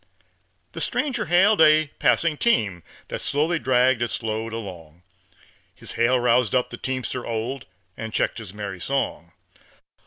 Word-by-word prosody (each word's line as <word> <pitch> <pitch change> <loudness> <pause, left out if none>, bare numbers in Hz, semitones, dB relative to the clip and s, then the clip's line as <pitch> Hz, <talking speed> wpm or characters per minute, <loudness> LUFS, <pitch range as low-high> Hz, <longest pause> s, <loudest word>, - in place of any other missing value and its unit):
The - - -7
stranger 280 -4 -1
hailed 190 +3 +4
a 155 -1 +5
passing 165 -2 +3
team 105 - +1 0.3
That - - -4
slowly 160 +4 0
dragged 130 -2 +3
its 120 0 -2
load 110 +1 -3
along; 90 -7 -8 0.7
His - - -8
hail 120 +2 +2
roused 120 -1 +2
up 125 - +1
the 120 - -6
teamster 130 -1 -3
old, 120 +4 -4 0.3
And 110 0 -6
checked 115 - -1
his 110 -5 -9
merry 100 -2 -6
song. 85 -5 -3
120 Hz, 145 wpm, -24 LUFS, 110-140 Hz, 0.7 s, a